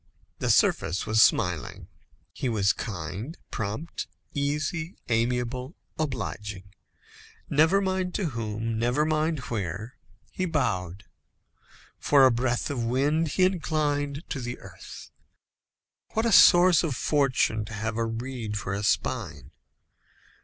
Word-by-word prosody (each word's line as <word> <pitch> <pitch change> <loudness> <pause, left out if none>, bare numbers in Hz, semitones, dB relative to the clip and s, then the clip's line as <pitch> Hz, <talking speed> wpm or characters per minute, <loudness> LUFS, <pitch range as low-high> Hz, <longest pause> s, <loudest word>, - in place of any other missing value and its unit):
The - - -1
surface 90 +4 +2
was 110 0 +3
smiling. - - +1 0.5
He 130 - -2
was 100 -3 +2
kind, 105 - -6
prompt, 110 +10 -4 0.3
easy, 150 +4 -2
amiable, 125 +4 -1 0.2
obliging. 105 - -4 0.9
Never 160 +7 +4
mind 185 -2 -1
to 190 -6 0
whom, 115 -2 -3
never 125 +6 +1
mind 155 +1 +1
where, 105 +3 -4 0.3
he 185 - -2
bowed. 95 - -2 0.9
For 140 -2 +5
a 130 - +6
breath 120 +2 0
of 125 -4 -2
wind 145 +7 +1
he 185 +5 +1
inclined 150 -5 0
to 140 - -2
the 120 0 -5
earth. - - -12 1.0
What 220 +1 +1
a 230 - +2
source 175 -3 +7
of 155 -7 -2
fortune 130 -7 +1
to 110 - -9
have 110 +1 -3
a 115 0 0
reed 115 -1 -4
for 95 -1 -3
a 100 - -2
spine! 85 - -1
125 Hz, 125 wpm, -27 LUFS, 110-155 Hz, 1.0 s, source